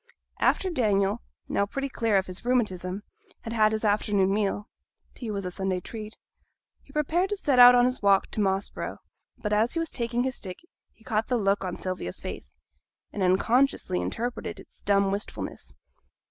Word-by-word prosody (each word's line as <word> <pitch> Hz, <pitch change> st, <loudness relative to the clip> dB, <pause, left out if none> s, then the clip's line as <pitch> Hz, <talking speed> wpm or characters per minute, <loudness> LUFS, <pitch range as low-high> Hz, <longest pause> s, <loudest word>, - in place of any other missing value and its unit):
After 375 Hz, -, +2 dB
Daniel, 210 Hz, -, +1 dB, 0.3 s
now 200 Hz, -, 0 dB
pretty 275 Hz, +6 st, -3 dB
clear 230 Hz, -5 st, +1 dB
of 190 Hz, -, +1 dB
his 185 Hz, 0 st, -8 dB
rheumatism, 205 Hz, -6 st, 0 dB, 0.4 s
had 230 Hz, -, -6 dB
had 215 Hz, -2 st, +4 dB
his 220 Hz, 0 st, -1 dB
afternoon 205 Hz, -2 st, +2 dB
meal 205 Hz, 0 st, -1 dB, 0.5 s
(tea 235 Hz, -, -6 dB
was 200 Hz, -2 st, -3 dB
a 180 Hz, -, -3 dB
Sunday 190 Hz, 0 st, -1 dB
treat), 215 Hz, +3 st, -8 dB, 0.6 s
he -, -, -20 dB
prepared 330 Hz, +5 st, +1 dB
to 415 Hz, -, -1 dB
set 275 Hz, -9 st, +2 dB
out 245 Hz, 0 st, +10 dB
on 245 Hz, 0 st, +5 dB
his 255 Hz, +1 st, 0 dB
walk 200 Hz, -1 st, +4 dB
to 215 Hz, -, -1 dB
Moss 195 Hz, 0 st, +1 dB
Brow; -, -, -6 dB, 0.4 s
but 210 Hz, -1 st, -2 dB
as 220 Hz, +3 st, +2 dB
he -, -, +1 dB
was 330 Hz, -2 st, -1 dB
taking 235 Hz, 0 st, 0 dB
his 260 Hz, 0 st, -2 dB
stick 185 Hz, -2 st, -5 dB, 0.3 s
he 225 Hz, -, -25 dB
caught 220 Hz, -1 st, 0 dB
the 250 Hz, -, +1 dB
look 200 Hz, -2 st, +1 dB
on 180 Hz, -2 st, -4 dB
Sylvia's 185 Hz, -, -4 dB
face; -, -, -8 dB, 0.6 s
and 205 Hz, -, -4 dB
unconsciously 195 Hz, -, +2 dB
interpreted 235 Hz, -, -4 dB
its -, -, -17 dB
dumb 200 Hz, -1 st, +2 dB
wistfulness. 200 Hz, +2 st, -4 dB
210 Hz, 180 wpm, -27 LUFS, 195-245 Hz, 0.6 s, out